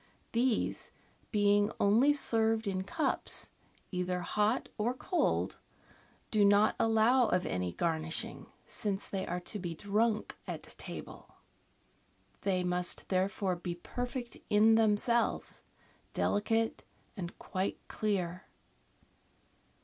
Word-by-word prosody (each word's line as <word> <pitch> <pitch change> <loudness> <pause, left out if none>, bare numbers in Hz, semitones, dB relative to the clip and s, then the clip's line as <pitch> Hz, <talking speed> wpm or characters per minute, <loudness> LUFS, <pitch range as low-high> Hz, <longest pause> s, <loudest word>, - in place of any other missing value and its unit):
These, 235 0 0 0.4
being 205 -1 +3
only 225 +8 +5
served 225 -5 +3
in 190 -2 -1
cups, 295 - -1 0.4
either 180 -1 -1
hot 210 +6 +1
or 235 +3 0
cold, 355 +7 0 0.7
do 215 -2 +4
not 205 +1 +5
allow 225 +3 +4
of 180 -2 +1
any 90 -1 -1
garnishing, 160 -1 -1 0.2
since 205 -3 -3
they 190 -1 -3
are 175 +1 -2
to 205 +4 -4
be 175 -3 -4
drunk 210 +4 0
at - - -5 0.2
table. - - -9 1.1
They 185 -2 +1
must 180 0 -1
therefore 190 0 +1
be 175 0 -4
perfect 245 +6 -5
in 215 +2 +6
themselves, 225 +2 +2 0.5
delicate, 225 +2 +1 0.3
and 180 -4 -6
quite 190 +1 -2
clear. 185 -4 -2
205 Hz, 105 wpm, -32 LUFS, 185-225 Hz, 1.1 s, in